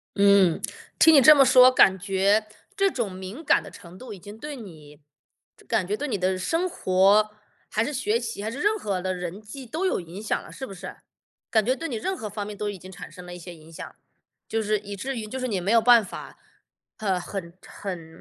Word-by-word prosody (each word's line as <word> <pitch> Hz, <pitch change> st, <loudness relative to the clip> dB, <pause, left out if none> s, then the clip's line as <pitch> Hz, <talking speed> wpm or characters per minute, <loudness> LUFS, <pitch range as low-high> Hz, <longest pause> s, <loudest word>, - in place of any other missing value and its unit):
嗯。 200 Hz, -4 st, +4 dB, 0.4 s
听 320 Hz, -, +7 dB
你 280 Hz, -, +8 dB
这 305 Hz, +5 st, +9 dB
么 275 Hz, -2 st, +6 dB
说， 255 Hz, 0 st, +7 dB
感 190 Hz, -6 st, +5 dB
觉 200 Hz, +3 st, +1 dB, 0.3 s
这 395 Hz, -1 st, +3 dB
种 240 Hz, -8 st, -2 dB
敏 190 Hz, -, -8 dB
感 -, -, +3 dB
的 -, -, -10 dB
程 175 Hz, +1 st, -13 dB
度 250 Hz, +2 st, -10 dB
已 195 Hz, -, -11 dB
经 205 Hz, +4 st, -11 dB
对 295 Hz, +4 st, -7 dB
你 155 Hz, -, -13 dB, 0.7 s
感 180 Hz, -, 0 dB
觉 205 Hz, -, -1 dB
对 290 Hz, +7 st, -4 dB
你 215 Hz, -, -1 dB
的 185 Hz, 0 st, 0 dB
生 330 Hz, -, -1 dB
活， 200 Hz, -, +3 dB, 0.4 s
还 220 Hz, +1 st, 0 dB
是 295 Hz, -, -4 dB
学 235 Hz, -4 st, 0 dB
习， 230 Hz, -3 st, -5 dB
还 215 Hz, -, -2 dB
是 260 Hz, -, -7 dB
任 420 Hz, +6 st, +2 dB
何 200 Hz, -, -3 dB
的 185 Hz, +1 st, -2 dB
人 180 Hz, +2 st, -6 dB
际 255 Hz, +6 st, -10 dB
都 315 Hz, +10 st, -3 dB
有 375 Hz, -, +1 dB
影 175 Hz, +4 st, -10 dB
响 215 Hz, -, -1 dB
了， -, -, -13 dB
是 265 Hz, -, -7 dB
不 -, -, -9 dB
是？ 190 Hz, 0 st, -9 dB, 0.5 s
感 220 Hz, -3 st, +2 dB
觉 255 Hz, -, +2 dB
对 330 Hz, +4 st, -5 dB
你 255 Hz, -, -4 dB
任 380 Hz, +13 st, -2 dB
何 215 Hz, -, -6 dB
方 205 Hz, 0 st, -5 dB
面 205 Hz, 0 st, -8 dB
都 210 Hz, 0 st, -3 dB
已 205 Hz, -, -6 dB
经 185 Hz, +1 st, -12 dB
产 190 Hz, +1 st, -10 dB
生 180 Hz, -2 st, -12 dB
了 175 Hz, -, -9 dB
一 -, -, -8 dB
些 175 Hz, 0 st, -10 dB
影 160 Hz, 0 st, -16 dB
响， 165 Hz, -, -9 dB, 0.5 s
就 225 Hz, -, 0 dB
是 215 Hz, 0 st, +1 dB
以 205 Hz, 0 st, -9 dB
至 265 Hz, +8 st, -4 dB
于 220 Hz, -, -4 dB
就 260 Hz, +5 st, -6 dB
是 255 Hz, -, -2 dB
你 205 Hz, -6 st, -1 dB
没 195 Hz, +4 st, -1 dB
有 230 Hz, 0 st, +5 dB
办 235 Hz, 0 st, +6 dB
法， -, -, -10 dB, 0.6 s
呃， 195 Hz, -4 st, -1 dB
很 175 Hz, -2 st, -7 dB
很 170 Hz, -5 st, -8 dB
205 Hz, 255 characters per minute, -25 LUFS, 185-245 Hz, 0.7 s, 这